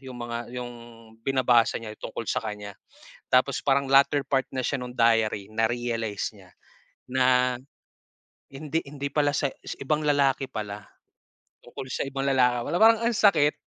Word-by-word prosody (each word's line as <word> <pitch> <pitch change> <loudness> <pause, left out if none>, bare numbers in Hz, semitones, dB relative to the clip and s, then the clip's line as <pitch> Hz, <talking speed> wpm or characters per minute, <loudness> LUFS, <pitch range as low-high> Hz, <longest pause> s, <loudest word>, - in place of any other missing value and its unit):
'yung 130 -2 -10
mga 120 0 -5
yung 120 -1 -5 0.5
binabasa 125 -2 +3
niya 110 -2 -7
tungkol 115 - -6
sa - - -1
kanya. 105 -2 -6 0.6
Tapos 130 +2 +2
parang 140 -1 +1
latter 140 +1 +5
part 135 -1 0
na 130 - -2
siya 140 +2 -1
no'ng 125 0 -7
diary, 115 -4 +2
na-realize 115 -2 -1
niya 95 -3 -18 0.6
na 125 -1 +3 1.0
hindi 150 +3 -3
hindi 140 0 -5
pala 145 -1 +2
sa 145 - +1 0.3
ibang 150 +3 0
lalaki 140 -2 +2
pala, 105 -1 -6 0.8
tungkol 130 - -9
sa - - -1
ibang 135 0 -4
lalaki 125 -2 +3
pala. 175 - +1
Parang 225 0 +6
ang 235 0 +1
sakit, 160 -9 +4
130 Hz, 150 wpm, -26 LUFS, 115-140 Hz, 1.0 s, Parang